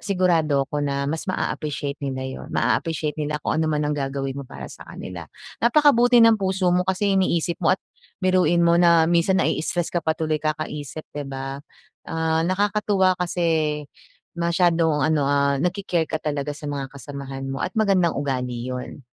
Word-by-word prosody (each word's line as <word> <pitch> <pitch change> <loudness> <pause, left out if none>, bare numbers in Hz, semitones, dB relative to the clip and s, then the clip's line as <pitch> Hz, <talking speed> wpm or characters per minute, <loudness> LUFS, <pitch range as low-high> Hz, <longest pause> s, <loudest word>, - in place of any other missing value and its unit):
sigurado 165 -7 +2
'ko 145 - 0
na 140 -1 -1
mas 160 +7 -3
maa-appreciate 145 -5 -3
nila 130 -2 -3
yun. 130 0 -7
Maa-appreciate 155 -2 0
nila 150 0 -1
kung 160 - 0
ano 160 - +1
man 150 -1 0
ang 150 - 0
gagawin 135 -1 -2
mo 140 - -8
para - - -8
sa - - -13
kanila. 85 -3 -8 0.3
Napakabuti 245 -1 +5
ng 225 -2 +5
puso 190 -2 +1
mo 180 - +3
kasi 195 +1 +1
iniisip 175 -3 +1
mo 175 +2 +3
at - - -47 0.4
biruin 185 -2 +3
mo 170 +1 +4
na 170 -2 +6
minsan 170 +3 +2
nai-i-stress 175 -1 0
ka 175 - +1
pa 160 0 -1
tuloy 155 -1 -1
kakaisip, 155 -1 -4
'di 145 -2 -5
ba. 135 +1 -5 0.5
Ah, 160 0 0
nakakatuwa 200 -1 +2
kasi 160 -4 0 0.5
masyadong 170 -3 +2
ano, 150 -3 +2
ah, 140 -1 +2
nagki-care 175 -2 -1
ka - - -1
talaga 145 -1 -2
sa 150 - -12
mga 140 -2 -4
kasamahan 140 -1 -7
mo 135 - -5
at - - -3
magandang 195 -5 +2
ugali 125 -4 -2
yun, 125 +1 -6
160 Hz, 170 wpm, -23 LUFS, 140-180 Hz, 0.5 s, na